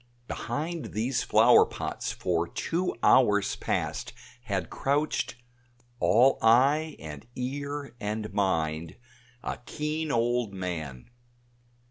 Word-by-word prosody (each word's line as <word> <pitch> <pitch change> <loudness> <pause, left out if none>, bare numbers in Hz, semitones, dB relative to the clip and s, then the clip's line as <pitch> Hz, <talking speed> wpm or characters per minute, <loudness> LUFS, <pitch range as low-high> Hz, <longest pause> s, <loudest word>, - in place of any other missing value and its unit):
Behind 155 +7 -4
these 120 +4 0
flower - - +6
pots - - -4
for 85 -1 -1
two 175 - -2
hours 105 -6 +4
past - - -2 0.3
had 95 -6 -2
crouched 145 -1 0 0.6
all 125 +5 +4
eye 140 +8 +4
and 75 +2 -9
ear 140 +1 -4
and 105 0 -3
mind 80 -5 0 0.5
a - - -4
keen 150 +1 -2
old 120 -3 0
man. 80 - -5
115 Hz, 100 wpm, -28 LUFS, 95-145 Hz, 0.6 s, flower